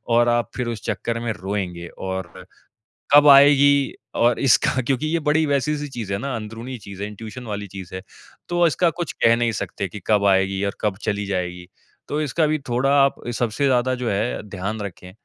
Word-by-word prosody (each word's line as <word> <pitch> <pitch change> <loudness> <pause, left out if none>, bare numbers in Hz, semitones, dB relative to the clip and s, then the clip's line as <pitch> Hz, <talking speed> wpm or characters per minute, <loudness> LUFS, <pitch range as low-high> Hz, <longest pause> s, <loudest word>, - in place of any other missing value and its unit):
और 120 0 +4
आप 120 -2 +1
फिर 125 -2 -2
उस 115 -2 -4
चक्कर 115 0 -2
में 120 -1 -2
रोएँगे 90 -3 -4
और, 95 -1 -6 0.7
कब 145 0 +8
आएगी 140 0 +6 0.3
और 120 0 +3
इसका 130 -1 +3
क्योंकि 140 +3 0
ये 165 +1 0
बड़ी 155 +1 +3
वैसी 145 +1 0
सी 145 0 -5
चीज़ 115 -7 -6
है - - 0
ना 140 -2 -3
अंदरूनी 115 +4 -6
चीज़ 100 -3 -10
है, 105 - -2
इंट्यूशन 110 +4 -9
वाली 105 -1 -4
चीज़ 95 -2 -10
है, 95 - -5 0.5
तो 175 0 +3
इसका 165 +3 +2
कुछ 175 -3 -3
कह 115 0 +6
नहीं 120 -1 +1
सकते 100 0 -4
कि 100 +4 -9
कब 105 -2 +3
आएगी 95 0 +2
और 100 - -3
कब 105 -3 -1
चली 105 -1 -2
जाएगी। 90 -2 -3 0.4
तो 150 +1 -2
इसका 155 +2 +1
भी 155 0 0
थोड़ा 125 +3 +1
आप 140 - 0 0.2
सबसे 120 +4 0
ज़्यादा 130 -1 +2
जो 120 - 0
है 105 +5 -1
ध्यान 100 +3 -4
रखें। 90 -2 -8
115 Hz, 200 wpm, -22 LUFS, 100-140 Hz, 0.7 s, कब